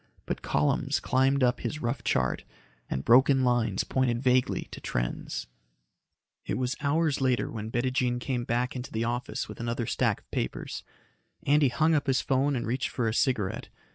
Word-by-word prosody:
But -, -, -3 dB
columns 75 Hz, 0 st, +1 dB
climbed 130 Hz, +2 st, +2 dB
up 125 Hz, -1 st, +3 dB
his 150 Hz, -, -3 dB
rough 125 Hz, 0 st, -2 dB
chart 65 Hz, -1 st, 0 dB, 0.5 s
and 65 Hz, -, -3 dB
broken 130 Hz, +2 st, +5 dB
lines 120 Hz, -5 st, +1 dB
pointed 125 Hz, -3 st, 0 dB
vaguely 125 Hz, 0 st, +2 dB
to -, -, -8 dB
trends. -, -, -3 dB, 1.0 s
It -, -, -2 dB
was 130 Hz, 0 st, -1 dB
hours 150 Hz, 0 st, +1 dB
later 130 Hz, -2 st, +1 dB
when 110 Hz, -1 st, -5 dB
Bettijean 125 Hz, 0 st, 0 dB
came 125 Hz, -1 st, -2 dB
back 120 Hz, +2 st, -1 dB
into 125 Hz, 0 st, -6 dB
the 110 Hz, +1 st, -1 dB
office 120 Hz, +2 st, -2 dB
with -, -, -10 dB
another 115 Hz, 0 st, -2 dB
stack -, -, 0 dB
of -, -, -37 dB
papers. -, -, -3 dB, 0.6 s
Andy 145 Hz, -1 st, +4 dB
hung 155 Hz, +6 st, +2 dB
up 145 Hz, -2 st, +1 dB
his 130 Hz, -1 st, +3 dB
phone 135 Hz, +1 st, +1 dB
and 120 Hz, -, -2 dB
reached 125 Hz, +3 st, -1 dB
for 120 Hz, -3 st, -1 dB
a 110 Hz, -, 0 dB
cigarette. 110 Hz, -6 st, 0 dB
125 Hz, 170 wpm, -28 LUFS, 120-135 Hz, 1.0 s, broken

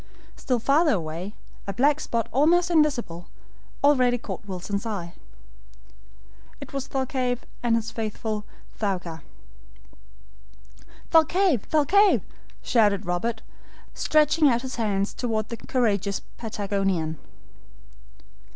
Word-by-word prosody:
Still 250 Hz, -3 st, -1 dB
farther 285 Hz, +7 st, +3 dB
away, 170 Hz, +4 st, -5 dB, 0.3 s
a 200 Hz, -, -2 dB
black 285 Hz, +8 st, +3 dB
spot 230 Hz, -5 st, -2 dB
almost 340 Hz, +6 st, +3 dB
invisible, 245 Hz, -, +1 dB, 0.6 s
already 255 Hz, -4 st, +4 dB
caught 220 Hz, -, -7 dB
Wilson's 195 Hz, +2 st, -3 dB
eye. 195 Hz, -7 st, -4 dB, 1.5 s
It -, -, -10 dB
was 275 Hz, -1 st, -3 dB
Thalcave 260 Hz, -2 st, -1 dB, 0.2 s
and 235 Hz, -1 st, +2 dB
his 225 Hz, 0 st, -2 dB
faithful 215 Hz, -1 st, -3 dB, 0.4 s
Thaouka. 180 Hz, -6 st, -2 dB, 1.9 s
"Thalcave, 325 Hz, -, +3 dB
Thalcave!" 380 Hz, +7 st, +4 dB, 0.4 s
shouted 205 Hz, -4 st, +2 dB
Robert, 220 Hz, +6 st, -2 dB, 0.5 s
stretching 305 Hz, 0 st, +3 dB
out 240 Hz, 0 st, +1 dB
his 260 Hz, -2 st, -5 dB
hands 205 Hz, -3 st, 0 dB
toward 220 Hz, -3 st, -2 dB
the 230 Hz, -, -5 dB
courageous 205 Hz, -6 st, 0 dB, 0.2 s
Patagonian. 195 Hz, -7 st, -2 dB
230 Hz, 100 wpm, -25 LUFS, 200-275 Hz, 1.9 s, already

